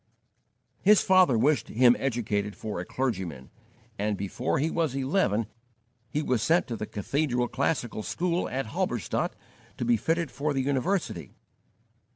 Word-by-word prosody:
His 210 +1 +6
father 185 -10 +5
wished 140 +6 +2
him 125 +1 +5
educated 105 -6 -1
for 105 -4 -5
a 90 - -4
clergyman, 95 - -3 0.5
and 105 0 0
before 100 +7 -2
he 155 +4 0
was 160 -6 0
eleven 130 - +1 0.6
he 150 - -1
was 125 -6 +1
sent 165 +9 +3
to 115 - -2
the 105 -1 -5
cathedral 125 +3 -1
classical 130 -5 -1
school 175 +8 -1
at 135 +1 -2
Halberstadt 125 - -2 0.4
to - - -2
be 120 -1 +3
fitted 165 +5 -1
for 145 +1 -1
the 135 - 0
university. 140 - -1
130 Hz, 145 wpm, -27 LUFS, 110-155 Hz, 0.6 s, His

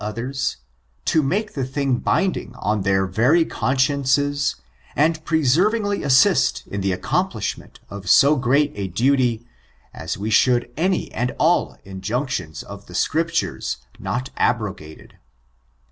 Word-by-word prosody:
375 110 +3 -4
ers, 140 0 -2 0.5
to 160 - +3
make 200 +10 -1
the 135 - -2
thing 135 0 -1
binding 185 -4 -1
on 105 -3 -1
their 95 0 +2
very 125 - +3
con 130 - -1
sciences, 140 +1 +1 0.4
and 160 +2 +1
perseveringly 195 - +2
assist 70 - +3
in 100 - -5
the 95 0 0
accomplish 90 - -1
ment - - -16
of 100 -2 -7
so 145 +2 +6
great 140 +3 +2
a 100 -1 -4
duty, 120 +3 +1 0.5
as 80 - -5
we 105 +3 -3
should 120 +2 +3
any 185 +4 0
and 125 +2 -2
all 170 +3 +2
injunctions 95 - -4
of 100 0 -11
the 90 - -10
Scriptures 165 - -1 0.2
not 125 +2 -3
abrogated. 100 -10 -3
130 Hz, 135 wpm, -21 LUFS, 100-145 Hz, 0.5 s, so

